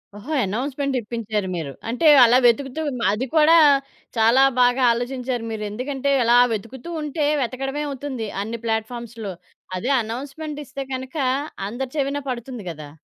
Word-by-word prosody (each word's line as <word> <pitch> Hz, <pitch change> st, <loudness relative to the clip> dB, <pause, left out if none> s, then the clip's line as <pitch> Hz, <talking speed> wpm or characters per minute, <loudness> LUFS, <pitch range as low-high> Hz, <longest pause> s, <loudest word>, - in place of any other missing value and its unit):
ఓహో! 245 Hz, +10 st, -6 dB
అనౌన్స్‌మెంట్ 265 Hz, +7 st, -2 dB
ఇప్పించారు 215 Hz, -3 st, -3 dB
మీరు. 160 Hz, -5 st, -4 dB, 0.2 s
అంటే 250 Hz, +8 st, +1 dB, 0.2 s
అలా 240 Hz, +2 st, +5 dB
వెతుకుతూ 270 Hz, +5 st, +2 dB, 0.3 s
అది 230 Hz, +5 st, -2 dB
కూడా 320 Hz, +1 st, +6 dB, 0.6 s
చాలా 230 Hz, +4 st, +5 dB, 0.2 s
బాగా 245 Hz, +1 st, +4 dB
ఆలోచించారు 245 Hz, 0 st, -2 dB
మీరు. 215 Hz, -1 st, -4 dB
ఎందుకంటే, 270 Hz, +5 st, -2 dB
అలా 235 Hz, +1 st, +5 dB, 0.2 s
వెతుకుతూంటే 290 Hz, +7 st, -4 dB, 0.2 s
వెతకడమే 270 Hz, +4 st, -3 dB
అవుతుంది. 265 Hz, -4 st, -5 dB, 0.2 s
అన్ని 230 Hz, +2 st, -5 dB
ప్లాట్‌ఫార్మ్స్‌లో. 225 Hz, -2 st, -3 dB, 0.4 s
అదే 245 Hz, +9 st, -1 dB
అనౌన్స్‌మెంటిస్తే 280 Hz, +4 st, -6 dB
గనుక 260 Hz, +4 st, -5 dB, 0.5 s
అందరి 250 Hz, +4 st, -5 dB
చెవిన 280 Hz, 0 st, -1 dB
పడుతుంది 245 Hz, -3 st, -5 dB
గదా! 155 Hz, -3 st, -8 dB
250 Hz, 125 wpm, -22 LUFS, 225-275 Hz, 0.6 s, కూడా